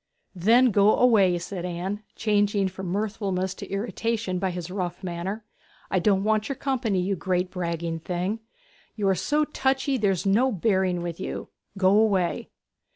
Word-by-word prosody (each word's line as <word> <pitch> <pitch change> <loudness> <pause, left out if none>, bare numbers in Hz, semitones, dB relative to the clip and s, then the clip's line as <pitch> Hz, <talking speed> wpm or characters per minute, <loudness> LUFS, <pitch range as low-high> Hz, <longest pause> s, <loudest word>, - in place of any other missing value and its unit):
'Then 230 +7 +4
go 205 +1 +5
away!' 200 -8 +4
said 175 +1 -5
Anne, 180 +4 -3
changed 205 -2 +1
from 190 0 -6
mirthfulness 195 -1 -2
to - - -9
irritation 205 -1 -2
by 190 0 0
his 180 0 -5
rough 180 -1 -4
manner. 185 +5 -4 0.5
'I 185 - +3
don't 195 +1 +2
want 215 +2 +1
your 275 - -2
company, 245 -8 -1
you 190 +2 0
great 180 0 -1
bragging 170 -2 -3
thing! 180 +6 -2 0.6
You 210 -3 -1
are - - +4
so 295 - +1
touchy 270 -1 0
there's 195 -4 +1
no 230 +7 +3
bearing 185 -3 +1
with 170 0 -5
you. - - -5 0.3
Go 190 0 +4
away!' 200 -4 +2
195 Hz, 155 wpm, -25 LUFS, 180-215 Hz, 0.6 s, go